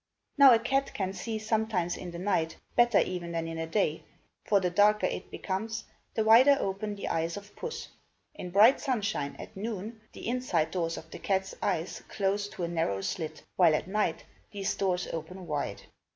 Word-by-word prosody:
Now 280 -2 +9
a 235 - +7
cat 270 +4 0
can 190 -1 -2
see 225 +2 -4
sometimes 215 -5 0
in 180 - -7
the 170 - -7
night, 170 -4 0 0.2
better 240 -3 +5
even 175 -2 0
than 165 0 -2
in 165 0 -5
the 160 0 -3
day, 165 -3 0 0.4
for 205 - +3
the 180 -2 0
darker 210 +3 +4
it - - -3
becomes, 225 +4 -3 0.3
the 220 - +2
wider 250 +6 +7
open 200 +2 -2
the 200 - -5
eyes 165 +2 -1
of 205 0 -11
puss. 470 - -5 0.5
In 180 -12 -7
bright 210 +8 +6
sunshine, 215 - -1
at - - -10
noon, 215 +2 -5
the - - -8
inside 235 -10 0
doors 165 -2 -1
of 160 - -10
the - - -8
cat's 190 -1 -1
eyes 180 -3 -1
close 200 0 0
to 185 - -6
a - - 0
narrow 160 -13 -1
slit, 155 - -4
while 170 -4 +6
at 155 - -2
night 210 +2 -1 0.2
these 200 -3 -2
doors 180 -2 0
open 175 +3 -6
wide. 145 -3 -3
195 Hz, 190 wpm, -29 LUFS, 170-220 Hz, 0.5 s, Now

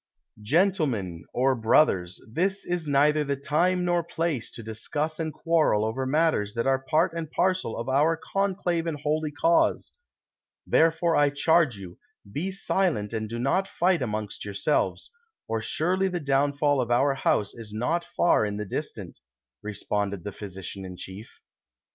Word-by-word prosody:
"Gentlemen, 125 - 0
or 130 +2 +2
brothers, 110 - +2
this 190 - -1
is 175 -3 -2
neitlier 150 +1 +3
the 140 - 0
time 175 +6 +1
nor 175 -1 +1
place 160 -6 -2
to 115 - -9
discuss 150 +9 -4
and 160 -1 -2
quarrel 155 -11 +2
over 130 +4 -2
matters 140 -8 +1
that 115 - -1
are 135 0 +3
part 155 +4 +1
and 165 -2 -4
parcel 185 -8 0
of 115 - -4
our 150 +5 +3
conclave 180 -3 -1
and 155 -3 -3
holy 155 +1 0
cause; 165 +3 +2 0.7
therefore 165 +1 +3
I 145 -1 +4
charge 145 -3 +2
you, 90 -3 -10 0.3
be 180 +9 -2
silent 180 - 0
and 110 -1 -3
do 115 - -4
not 160 +11 +1
fight 180 -3 +1
amongst 105 -4 -3
yourselves, 100 - -1 0.4
or 115 -1 -1
surely 185 - 0
the 180 -2 -2
downfall 140 0 +2
of 120 - -3
our 135 +4 +3
house 105 -6 0
is 115 -2 -9
not 125 +11 -1
far 175 -6 +2
in 105 -1 -2
the 105 - -3
distant," 95 - -6 0.4
responded 100 -2 -3
the 105 - -5
physician 95 -1 -8
in 90 -1 -8
chief. 95 +5 -9
145 Hz, 155 wpm, -26 LUFS, 110-165 Hz, 0.7 s, I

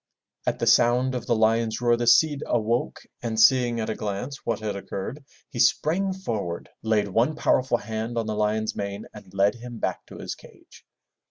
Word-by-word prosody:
At - - +1
the - - -1
sound 125 +2 +4
of 120 -2 -4
the 120 - +3
lion's 110 0 +2
roar 120 -1 +3
the 120 0 -2
Cid 150 +3 +5
awoke 115 +1 0 0.2
and 115 -2 -2
seeing 120 0 +5
at 110 - -2
a - - -1
glance 105 +8 -5
what 115 - -1
had 105 -2 -3
occurred, 100 +8 -6 0.3
he 125 - -6
sprang 185 +10 +2
forward, 110 - -4
laid 110 -2 +1
one 115 +10 +2
powerful 130 -4 +2
hand 110 +1 -4
on 115 - 0
the 110 - -2
lion's 105 +1 0
mane 100 +1 -4
and 100 -3 -13
led 100 +2 +3
him 120 0 -9
back - - -2
to - - -11
his - - -5
cage. - - -17
115 Hz, 190 wpm, -25 LUFS, 105-125 Hz, 0.3 s, Cid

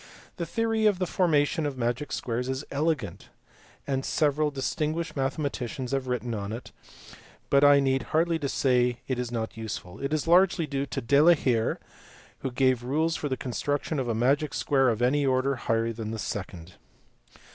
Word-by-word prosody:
The 170 - -3
theory 225 +4 +1
of 205 -3 +3
the 185 - 0
formation 160 -4 +1
of 140 -2 -5
magic 120 +4 -2
squares 125 +1 -2
is 130 +2 -3
elegant 140 - -2 0.6
and 135 -1 -1
several 150 0 +1
distinguished 155 +3 -2
mathematicians 135 -2 -3
have 135 -1 -1
written 125 -1 -2
on 100 -1 -4
it, 115 +3 -7 0.8
but 140 0 +5
I 145 0 +7
need 135 -1 +1
hardly 165 +1 +1
say 125 -3 +2
it 130 -2 -1
is 125 -1 -3
not 115 -1 -4
useful: 105 -4 -6
it 140 +1 -3
is 155 -1 0
largely 175 0 +4
due 140 -1 -3
to - - -4
De 140 +5 +4
la 170 +2 +7
Hire 120 -6 0 0.6
who 135 - -3
gave 130 -1 +2
rules 155 +6 0
for 145 - -3
the 130 - -1
construction 145 +5 -2
of 130 - -2
a 115 - 0
magic 140 +6 +1
square 135 -3 +2
of 115 +1 -1
any 145 +4 +3
order 135 +1 +1
higher 115 -1 -1
than 110 -1 -5
the 110 - -4
second. 90 -5 -6
135 Hz, 180 wpm, -27 LUFS, 120-150 Hz, 0.8 s, I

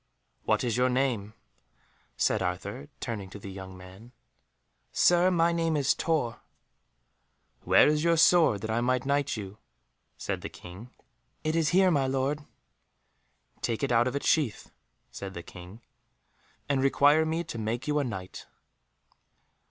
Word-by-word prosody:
"What - - +1
is 120 -2 -1
your 125 +1 +3
name?" 125 -5 -1 0.8
said - - +1
Arthur, 70 - -4
turning 105 -6 -5
to 100 - -9
the 100 -1 -9
young 95 -1 -9
man. 95 +7 -14 0.8
"Sir, 175 +1 +4
my 170 -2 +2
name 165 -2 0
is 140 -2 +2
Tor." 150 -8 -1 1.2
"Where - - +6
is 150 +1 +1
your 170 0 +3
sword 160 - +5
that 110 - -3
I 115 +2 0
may 130 +1 +2
knight 140 0 -1
you?" 100 0 -8 0.6
said - - -4
the - - -6
King. 95 +7 -12 0.5
"It 155 0 -1
is 165 -2 +2
here, 185 +1 +4
my 140 -4 +1
lord." 135 +3 -1 1.2
"Take 115 +3 -2
it 140 - 0
out 120 +1 +3
of 130 - -3
its 140 - -3
sheath," 140 -9 0 0.4
said 95 -1 -8
the 85 - -6
King, 90 +7 -12 0.9
"and 140 -2 +1
require 145 +3 +4
me 160 +2 -1
to 115 - -7
make 115 +4 -3
you 150 0 +1
a - - +1
Knight." 95 -7 -7
130 Hz, 150 wpm, -28 LUFS, 105-150 Hz, 1.2 s, Where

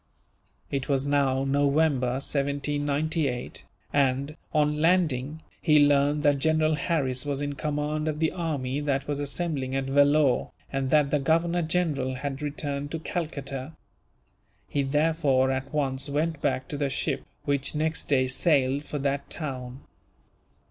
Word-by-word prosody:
It 135 -1 -2
was 135 -1 +1
now 140 -2 +2
November, 140 -2 +2
1798 145 0 -1 0.3
and, 140 +1 +1 0.2
on 150 -1 +1
landing, 160 -4 +1 0.2
he 150 -3 +5
learned 145 +1 +2
that 145 -2 +3
General 155 +1 +2
Harris 140 -5 0
was 145 -2 -2
in 145 0 -2
command 150 +2 -2
of 150 -1 -2
the 160 0 +2
army 145 -6 -2
that 140 -2 -1
was 145 -1 -2
assembling 145 -3 -2
at 135 - 0
Vellore, 145 -1 +3 0.2
and 135 -1 -1
that 150 -1 +3
the 150 - +2
Governor 165 +4 +2
General 155 -6 0
had 135 +1 -4
returned 145 -1 -3
to 165 - -3
Calcutta. 145 -4 -4 0.9
He 145 - 0
therefore 140 -2 +2
at 135 +1 -3
once 140 -2 0
went 155 +2 -1
back 130 -2 0
to 145 - -4
the 140 -1 0
ship, - - -1 0.2
which 140 +1 0
next 155 +1 -1
day 130 -3 +3
sailed 135 0 +1
for 150 - -4
that 140 0 -2
town. 130 -4 -5
145 Hz, 140 wpm, -27 LUFS, 135-155 Hz, 0.9 s, he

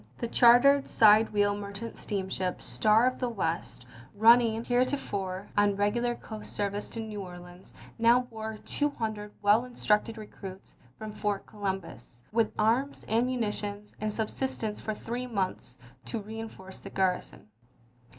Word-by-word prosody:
The 235 - -2
chartered 245 +4 +6
side 220 0 +6
wheel 205 -1 +2
mer 200 -1 -6
chant 220 +3 -6
steamship 190 -3 -3
Star 220 +2 +3
of 255 0 0
the 250 - 0
West, 165 - -3 0.3
running 230 +1 +5
hereto 255 +3 +2
fore 190 -5 -4
on 205 -1 +3
regular 235 +4 +1
coast 215 -2 -9
service 205 0 -2
to 230 - -7
New 215 -2 -5
Orleans, 180 0 -11 0.3
now 235 +2 +5
bore 220 -3 -6
two 290 0 0
hundred 215 -6 -4
well 210 +3 +5
instructed 225 -2 0
recruits 195 -3 -10 0.2
from 215 -1 -6
Fort 205 -1 -2
Columbus, 190 - -6
with 225 0 +2
arms, 240 +6 +1
ammunition, 215 -3 -1 0.2
and 215 0 -1
subsistence 220 0 -3
for 215 - -3
three 245 +4 -4
months, 190 - -3 0.3
to 230 - -3
reenforce 215 -3 -8
the 195 - -9
garrison. 185 - -1
215 Hz, 140 wpm, -29 LUFS, 200-235 Hz, 0.3 s, chartered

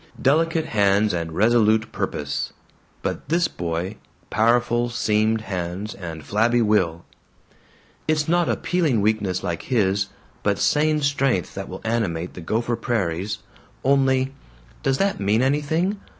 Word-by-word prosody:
Delicate 160 +3 +2
hands 100 - +2
and 85 -2 -2
resolute 110 +3 +3
purpose. 70 -1 -3 0.5
But - - -3
this 170 +1 +3
boy 85 - -4 0.3
powerful 120 +1 +2
seamed 110 -2 +1
hands 95 +1 -4
and 80 -4 -7
flabby 115 +3 +2
will. 90 -6 +1 1.0
"It's 155 -1 +1
not 175 +1 +2
appealing 160 - +1
weakness 100 -3 0
like 85 -3 -2
his, 100 -5 +1 0.3
but 100 -1 +1
sane 150 +6 +2
strength 135 - +1
that - - -6
will - - -7
animate 100 -7 -1
the 90 - -8
Gopher 115 +7 -1
Prairies. 100 -4 -2 0.4
Only 135 -1 +2 0.5
Does 135 0 +1
that 195 +4 +1
mean 105 +4 +2
anything? 160 +8 +1
110 Hz, 125 wpm, -23 LUFS, 95-135 Hz, 1.0 s, resolute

